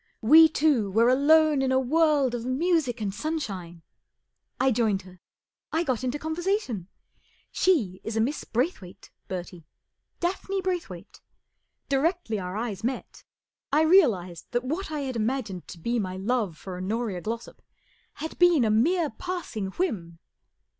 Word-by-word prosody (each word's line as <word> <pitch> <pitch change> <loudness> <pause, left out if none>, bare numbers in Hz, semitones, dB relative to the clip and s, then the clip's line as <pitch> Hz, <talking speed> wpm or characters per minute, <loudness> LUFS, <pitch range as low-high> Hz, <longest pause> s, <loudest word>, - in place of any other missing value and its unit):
We 315 +7 +8
two 285 -9 +2
were 225 +5 +4
alone 300 +2 +4
in 265 -1 +1
a 260 - +4
world 290 -1 +2
of 240 -1 -3
music 260 -2 0
and 200 -2 -2
sunshine. 195 - -4 0.8
I 265 0 +3
joined 215 -5 +1
her. 185 -1 -16 0.5
I 325 +2 +1
got 260 -6 -1
into 255 +3 -1
conversation. 315 - -2 0.6
She 225 - +1
is 225 0 -4
a - - +2
Miss 265 +7 0
Braythwayt, 230 - -3 0.2
Bertie 175 -3 -7 0.3
— - - -52
Daphne 385 +2 -2
Braythwayt. 345 - -5 0.7
Directly 280 - 0
our 180 +1 -5
eyes 220 -3 -4
met, 255 +2 -4 0.5
I 305 +3 +4
real¬ 325 - +6
ized 170 -2 -11
that 240 +1 +1
what 315 +9 -3
I 305 -2 -3
had 265 -2 -4
imagined 220 -5 -2
to - - -9
be 235 +8 -1
my 185 -3 -3
love 205 -4 -1
for 185 -2 -7
Honoria 200 0 -2
Glossop 230 +3 -6 0.5
had 320 - -7
bee 350 -1 +6
n 260 -7 +3
a 215 - +2
mere 310 +8 +2
pass¬ 360 +4 -6
ing 205 -3 -2
whim. 190 - -3
245 Hz, 155 wpm, -26 LUFS, 200-315 Hz, 0.8 s, We